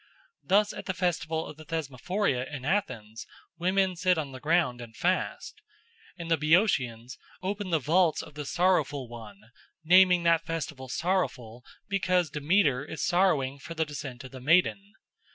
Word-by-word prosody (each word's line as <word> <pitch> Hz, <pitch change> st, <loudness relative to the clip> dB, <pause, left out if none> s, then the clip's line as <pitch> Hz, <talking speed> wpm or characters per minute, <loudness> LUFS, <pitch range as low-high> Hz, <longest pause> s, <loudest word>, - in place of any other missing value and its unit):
Thus 205 Hz, +2 st, +3 dB
at -, -, -8 dB
the 190 Hz, -, -2 dB
festival 165 Hz, -3 st, -1 dB
of 150 Hz, -, -10 dB
the 155 Hz, -, -11 dB
Thesmophoria 155 Hz, -, -2 dB
in 135 Hz, -3 st, -6 dB
Athens 115 Hz, -, -2 dB, 0.3 s
women 185 Hz, +1 st, +1 dB
sit 180 Hz, 0 st, +2 dB
on 145 Hz, -3 st, -3 dB
the 130 Hz, -, -9 dB
ground 150 Hz, -5 st, +1 dB
and 115 Hz, -2 st, -11 dB
fast. 180 Hz, +7 st, -2 dB, 0.6 s
And 170 Hz, -1 st, -6 dB
the 165 Hz, -, +4 dB
Boeotians 140 Hz, -, +1 dB, 0.2 s
open 200 Hz, +1 st, -3 dB
the 165 Hz, -, +3 dB
vaults 160 Hz, +4 st, +2 dB
of -, -, -12 dB
the 150 Hz, 0 st, -6 dB
Sorrowful 155 Hz, -7 st, +1 dB
One, 110 Hz, -2 st, -12 dB, 0.3 s
naming 180 Hz, +1 st, +6 dB
that 165 Hz, -1 st, +3 dB
festival 155 Hz, -5 st, -5 dB
sorrowful 125 Hz, -8 st, -2 dB, 0.2 s
because 185 Hz, -5 st, +1 dB
Demeter 150 Hz, -3 st, +2 dB
is 150 Hz, -2 st, -6 dB
sorrowing 150 Hz, -7 st, +2 dB
for 160 Hz, +5 st, -9 dB
the 160 Hz, 0 st, 0 dB
descent 140 Hz, -4 st, -7 dB
of 130 Hz, -, -10 dB
the 130 Hz, -1 st, -10 dB
Maiden. 180 Hz, +7 st, +2 dB
160 Hz, 155 wpm, -28 LUFS, 130-180 Hz, 0.6 s, naming